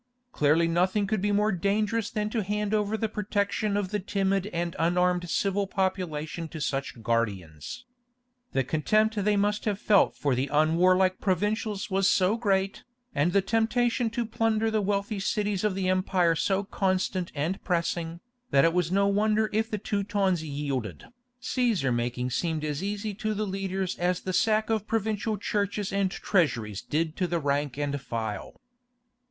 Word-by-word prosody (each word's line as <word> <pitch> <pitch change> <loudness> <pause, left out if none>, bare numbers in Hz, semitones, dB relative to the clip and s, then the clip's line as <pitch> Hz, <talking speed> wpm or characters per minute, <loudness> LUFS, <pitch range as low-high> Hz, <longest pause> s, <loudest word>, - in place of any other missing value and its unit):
Clearly 155 +1 +3
nothing 185 +5 +2
could 215 -1 -1
be 205 +1 +1
more 210 +1 +2
dangerous 205 +4 0
than 210 0 -2
to 225 - 0
hand 210 +1 -2
over 210 0 +1
the 225 - 0
protection 205 0 -1
of 200 -3 -1
the 210 - 0
timid 195 0 0
and 170 -3 -3
unarmed 180 +1 +2
civil 200 +2 0
population 175 -4 -2
to 160 - -8
such 135 -5 -3
guardians. 100 - -2 0.7
The 135 - +2
contempt 215 - +2
they 210 0 +2
must 205 +1 0
have 210 -3 0
felt 205 -1 +3
for 140 -2 0
the 130 +3 0
unwarlike 185 +5 +3
provincials 210 +2 -1
was 195 0 +3
so 190 +3 +3
great, 200 -4 0 0.3
and 155 +5 +2
the 200 +1 +3
temptation 230 +3 +1
to 235 +1 -2
plunder 225 0 +1
the 215 -1 +1
wealthy 200 +1 -1
cities 205 0 -1
of 210 -3 +1
the 190 -1 -1
empire 185 -2 +2
so 195 +5 +1
constant 185 -2 -1
and 160 +7 -2
pressing, 170 -1 -1 0.3
that 135 +1 +4
it 165 +1 +2
is 175 -1 +1
no 200 +1 +3
wonder 215 +2 +2
if 220 +1 +1
the 215 - -2
Teutons 200 -4 0
yielded. 140 - -4 0.3
Cæsar 235 - +1
making 120 +1 -2
seemed 160 +2 -1
as 150 +1 -2
easy 205 +2 -3
to 215 +1 -2
the 215 +1 -1
leaders 190 -1 -2
as 180 0 0
the 185 - -3
sack 215 +2 +2
of 215 -2 0
provincial 220 -1 -1
churches 200 0 -2
and 195 -1 +2
treasuries 115 - 0
did 160 +1 -1
to 180 - 0
the 170 0 0
rank 140 -2 -1
and 145 -1 -2
file. 110 -5 -5
190 Hz, 165 wpm, -27 LUFS, 165-210 Hz, 0.7 s, that